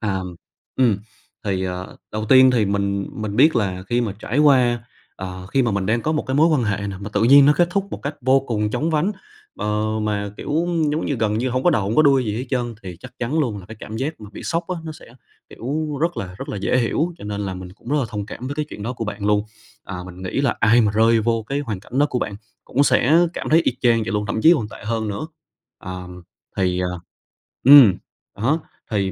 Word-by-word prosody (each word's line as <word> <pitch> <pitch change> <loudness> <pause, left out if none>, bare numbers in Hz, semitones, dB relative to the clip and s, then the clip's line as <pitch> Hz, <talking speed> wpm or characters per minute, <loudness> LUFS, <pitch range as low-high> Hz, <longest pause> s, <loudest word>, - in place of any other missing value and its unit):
À, 100 -4 -1
ừm, 90 -1 -6 0.4
ừm, 120 -6 +3 0.5
thì, 95 -2 -1
ờ, 90 0 -5 0.2
đầu 110 0 -2
tiên 130 +2 +7
thì 120 -4 +2
mình 100 0 -1
mình 105 -1 -5
biết 145 +1 +5
là 95 -4 -1
khi 120 0 +1
mà 110 -5 -1
trải 125 +4 -2
qua, 125 -5 +4 0.3
ờ, 95 0 -7
khi 130 +7 +1
mà 120 - +1
mình 100 -2 -1
đang 115 +3 +1
có 155 - 0
một 155 - 0
cái 130 - -2
mối 160 +3 +5
quan 150 -7 +2
hệ 100 -1 -1
nè 100 -1 -5
mà 100 - -5
tự 105 - +1
nhiên 140 +3 +8
nó 145 - +7
kết 175 -1 +3
thúc 195 +1 0
một - - -7
cách 145 +2 -3
vô 130 +2 +4
cùng 105 -5 -2
chóng 155 +8 -1
vánh, 165 +7 +1 0.5
ờ, 105 0 -1 0.2
mà, 105 -1 -2
kiểu, - - -8
ưm, 165 -2 +1
giống 155 +2 -1
như 145 - 0
gần 110 -1 0
như 125 +3 0
hông 130 +1 -1
có 175 - +4
đầu 135 -10 +1
hông 100 +4 -2
có 155 - +7
đuôi 135 -4 +4
gì 105 -1 -2
hết 130 - -4
trơn 120 -3 -1
thì 90 -3 -8
chắc 125 - -11
chắn 125 +6 -1
luôn 120 -9 0
là 95 - -11
cái 110 +2 -10
cảm 110 - -7
giác 140 +4 -3
mà 105 -1 -10
bị - - -9
sốc 170 0 -1
á 185 - -2
nó 160 - -5
sẽ, - - -14 0.4
kiểu, 150 +4 -3
rất 170 +2 0
là 90 -2 -5
rất - - -7
là - - -4
dễ 100 +6 +1
hiểu 155 +8 0
cho - - -10
nên 105 0 -4
là 95 -2 -3
mình 90 0 -9
cũng 105 - -15
rất 145 - +1
là 140 - +1
thông 105 -1 -5
cảm 120 +3 -7
với 140 - -4
cái 150 +1 -2
chuyện 105 - -8
đó 115 +4 -3
của 120 -2 -5
bạn 105 -1 -4
luôn. 105 0 +2 0.4
À, 90 - -6
mình 90 0 -10
nghĩ 95 +8 -2
là 140 -3 +1
ai 115 +3 +5
mà 105 -3 +2
rơi 115 +1 +4
vô 115 0 0
cái 140 - -1
hoàn 110 -9 -4
cảnh 125 +6 -6
đó 145 - +5
của 125 - 0
bạn 100 -4 -3 0.3
cũng 140 - +1
sẽ 155 +3 +4 0.2
cảm - - -4
thấy 160 +2 +5
y - - +1
chang 115 -2 +3
vậy - - -3
luôn, 105 0 -1
thậm 110 - -2
chí 165 - +8
còn 110 -9 -2
tệ - - -12
hơn 110 0 -2
nữa. 105 +9 -4 0.5
À, 90 - -7 0.6
thì, 90 -1 +1
à 90 - 0 0.8
ừm, 130 -7 +9 0.4
đó, 135 +10 +1 0.3
thì 100 -3 0
115 Hz, 265 wpm, -21 LUFS, 100-140 Hz, 0.8 s, ừm